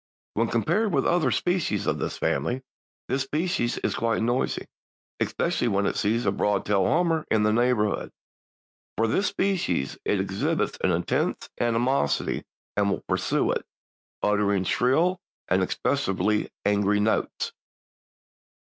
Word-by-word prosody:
When 115 +2 +1
compared 175 - +1
with 135 - +2
other 175 -2 +3
species 175 -2 0
of - - 0
the - - -1
family 130 +2 -1 0.4
this 135 +2 0
species 150 -2 -1
is - - -1
quite 115 -1 0
noisy, 120 +3 0 0.5
especially 120 - 0
when 100 -2 +1
it - - 0
sees 115 +3 +1
a 95 - +3
broad 100 0 0
tailed 100 -2 +2
hummer 165 +2 +2
in 110 -1 +3
the 105 0 +3
neighborhood. 115 -3 +1 0.9
For 115 - +3
this 190 - +1
species 175 - -1
it - - +1
exhibits - - -1
an - - +3
intense - - 0
animosity 120 - +1 0.3
and 100 -1 +2
will 95 - -2
pursue - - +1
it, - - -1 0.6
uttering 100 -2 +2
shrill 160 - +2 0.3
and 95 - +2
expressively 105 -1 0 0.2
angry 105 0 +2
notes. 110 +2 0
115 Hz, 135 wpm, -26 LUFS, 105-140 Hz, 0.9 s, other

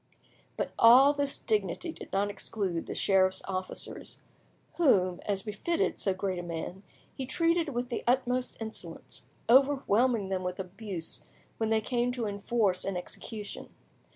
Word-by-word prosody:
But - - -2
all 255 +5 +8
this 285 -1 -1
dignity 215 - -1
did - - -11
not 200 +1 +1
exclude 190 -5 -3
the - - -4
sheriff's 190 -1 +2
officers, 185 -1 -5 0.6
whom, 185 - +3
as 195 -2 0
befitted 225 +11 -1
so 195 - +2
great 185 -1 -2
a - - -2
man, 175 +2 -5 0.3
he 265 - -5
treated 330 +3 +2
with 245 -2 -3
the 240 - -3
utmost 250 0 +1
insolence, 220 -1 -7 0.2
overwhelming 250 -5 +4
them 190 -1 -1
with 180 0 -4
abuse 185 -2 -6 0.4
when 220 -1 0
they 220 0 +3
came 245 +2 0
to 245 -3 -2
enforce 200 -2 0
an 195 -2 -2
execution. 205 +3 -7
215 Hz, 145 wpm, -30 LUFS, 190-250 Hz, 0.6 s, all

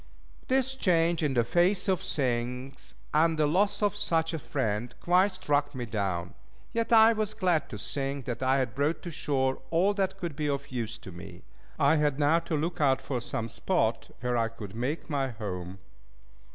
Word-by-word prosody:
This 265 0 +1
change 170 -8 +2
in 145 -4 0
the 120 - +4
face 175 - +2
of 190 -3 +2
things, 125 0 -3 0.2
and 160 +1 +3
the 155 - +3
loss 195 +8 +2
of 205 0 +2
such 165 -5 0
a 160 - -2
friend, 120 -5 -2
quite 185 +3 +3
struck 145 -6 0
me 125 -2 -3
down. 95 -6 -2 0.4
Yet 230 0 -1
I 225 0 +8
was 215 -1 -2
glad 180 -7 +1
to 105 - -6
think 135 +4 -3
that 120 0 -4
I 130 +1 +3
had 130 -5 -1
brought 145 +4 0
to 175 - -5
shore 130 -4 0
all 180 +5 +3
that 195 -2 -1
could 170 -5 -4
be 150 -1 -1
of 140 0 -3
use 115 -2 -3
to 95 - -10
me. 85 0 -11 0.3
I 145 +3 +4
had 150 -2 +1
now 150 +3 +4
to 165 -2 -2
look 165 +2 -2
out 135 -2 +4
for 130 -2 -3
some 115 0 -3
spot 115 - 0
where 125 -1 0
I 115 -1 +2
could 110 -4 -9
make 125 +8 -3
my 140 -4 -1
home. 95 -5 -6
145 Hz, 190 wpm, -29 LUFS, 120-175 Hz, 0.4 s, I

